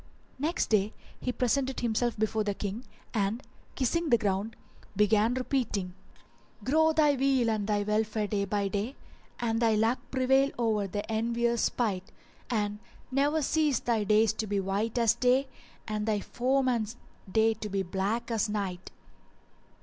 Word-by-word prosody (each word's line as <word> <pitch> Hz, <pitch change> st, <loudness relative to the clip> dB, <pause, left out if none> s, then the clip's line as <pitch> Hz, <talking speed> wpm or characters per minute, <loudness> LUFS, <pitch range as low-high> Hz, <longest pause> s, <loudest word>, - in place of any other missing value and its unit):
Next 315 Hz, 0 st, -1 dB
day 210 Hz, 0 st, +2 dB, 0.3 s
he 250 Hz, -, -2 dB
presented 260 Hz, +2 st, 0 dB
himself 235 Hz, 0 st, 0 dB
before 220 Hz, 0 st, 0 dB
the 205 Hz, -1 st, -2 dB
King 210 Hz, +6 st, -4 dB, 0.3 s
and, 215 Hz, +2 st, 0 dB, 0.3 s
kissing 315 Hz, +5 st, 0 dB
the 235 Hz, -, +6 dB
ground, 205 Hz, +1 st, -1 dB, 0.4 s
began 210 Hz, +3 st, +3 dB
repeating:— 240 Hz, -8 st, -1 dB, 0.7 s
"Grow 315 Hz, +4 st, +4 dB
thy 305 Hz, -2 st, +4 dB
weal 265 Hz, -3 st, +2 dB
and 210 Hz, -2 st, -1 dB
thy 205 Hz, -1 st, +1 dB
welfare 215 Hz, +1 st, 0 dB
day 200 Hz, 0 st, -1 dB
by 200 Hz, 0 st, 0 dB
day: 205 Hz, +7 st, -3 dB, 0.2 s
* -, -, -31 dB
And 225 Hz, -1 st, 0 dB
thy 225 Hz, -2 st, +3 dB
luck 225 Hz, +4 st, +2 dB
prevail 265 Hz, +1 st, +3 dB
o'er 220 Hz, -4 st, +1 dB
the 205 Hz, +2 st, -3 dB
envier's 235 Hz, +1 st, 0 dB
spite; 195 Hz, -6 st, -1 dB, 0.4 s
And 210 Hz, -3 st, -1 dB, 0.3 s
ne'er 290 Hz, +4 st, +2 dB
cease 300 Hz, -1 st, +2 dB
thy 230 Hz, -3 st, 0 dB
days 215 Hz, +1 st, +4 dB
to 220 Hz, 0 st, -3 dB
be 205 Hz, 0 st, 0 dB
white 200 Hz, +5 st, -1 dB
as 230 Hz, -2 st, +4 dB
day, 255 Hz, +2 st, +2 dB, 0.2 s
* -, -, -28 dB
And 215 Hz, 0 st, -2 dB
thy 215 Hz, -2 st, +1 dB
foeman's 245 Hz, -1 st, 0 dB, 0.3 s
day 225 Hz, +1 st, +4 dB
to 215 Hz, -1 st, -6 dB
be 195 Hz, -1 st, -1 dB
black 200 Hz, +6 st, -2 dB
as 225 Hz, -1 st, 0 dB
night!" 195 Hz, -4 st, -3 dB
225 Hz, 155 wpm, -29 LUFS, 210-250 Hz, 0.7 s, the